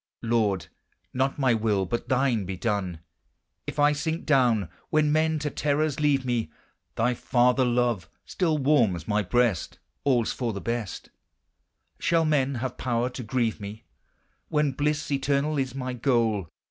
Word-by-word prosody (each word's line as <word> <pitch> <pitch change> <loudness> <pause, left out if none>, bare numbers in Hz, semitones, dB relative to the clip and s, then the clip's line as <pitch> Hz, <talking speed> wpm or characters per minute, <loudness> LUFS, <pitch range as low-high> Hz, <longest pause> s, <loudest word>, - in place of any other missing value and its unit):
Lord, 105 -7 +1 0.5
not 135 +2 0
my 130 -4 +3
will, 105 -3 +1
but 120 +6 -3
thine, 130 -5 +2
be 95 0 -5
done; 95 -6 -2 0.7
If - - -5
I 145 0 +5
sink 160 +3 -2
down 125 - +3 0.2
When 155 -1 +2
men 160 +1 +2
to 150 -1 -3
terrors 150 0 0
leave 145 -3 +2
me, 120 -9 -1 0.4
Thy 120 +2 +2
father 125 +2 +2
love 120 -8 +1 0.2
still 165 -4 0
warms 120 - +2
my 105 0 +2
breast; 110 -1 0 0.3
All's 125 -5 +2
for 120 -3 -2
the 100 - -4
best; 115 -4 -4 0.9
Shall 165 -1 +2
men 140 -3 +1
have 125 +1 -4
power 125 0 0
to 125 - -6
grieve 115 -1 -1
me, 105 +2 -8 0.7
When 150 -2 +2
bliss 150 +3 -1
eternal 140 +2 +1
is 130 -2 -2
my 130 -1 -3
goal. 115 - +1
125 Hz, 150 wpm, -26 LUFS, 110-145 Hz, 0.9 s, I